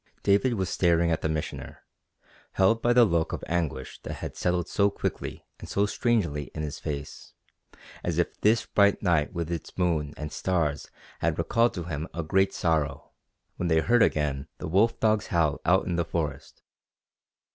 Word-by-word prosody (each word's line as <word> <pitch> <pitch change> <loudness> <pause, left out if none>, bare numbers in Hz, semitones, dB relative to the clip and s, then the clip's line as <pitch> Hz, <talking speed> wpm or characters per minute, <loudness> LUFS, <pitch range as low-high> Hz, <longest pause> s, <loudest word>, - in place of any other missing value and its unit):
David 100 +5 +3
was 95 -3 -1
staring 85 -1 +2
at 80 - 0
the 80 - -1
Missioner, 80 -1 -5 0.7
held 105 +4 +3
by 120 - +3
the 120 -1 +6
look 85 -5 0
of - - -4
anguish 80 -6 -3
that - - -6
had - - -7
settled 90 -1 0
so 100 -1 +2
quickly 100 - -4
and - - -9
so 100 - +2
strangely 95 - 0
in 80 - -3
his 75 0 -5
face, 75 -2 -6 0.7
as - - -1
if - - -1
this 110 +1 +3
bright 100 0 +3
night 85 -6 +2
with 85 -2 -4
its 85 -2 -5
moon 80 -5 0
and 75 0 -5
stars 80 -6 -1 0.3
had - - 0
recalled 115 +1 +2
to 90 - -3
him 80 -1 -4
a 85 - -2
great 95 +5 +2
sorrow, 75 -4 -1 0.5
when 90 - -1
they 80 -1 +3
heard 120 +8 +3
again 70 -6 +1
the - - -6
wolf 110 +8 +2
dog's 110 -1 +2
howl 80 -4 +1
out 90 +3 +3
in 85 -3 -1
the 85 - +2
forest. 75 -5 -4
85 Hz, 180 wpm, -27 LUFS, 75-100 Hz, 0.7 s, the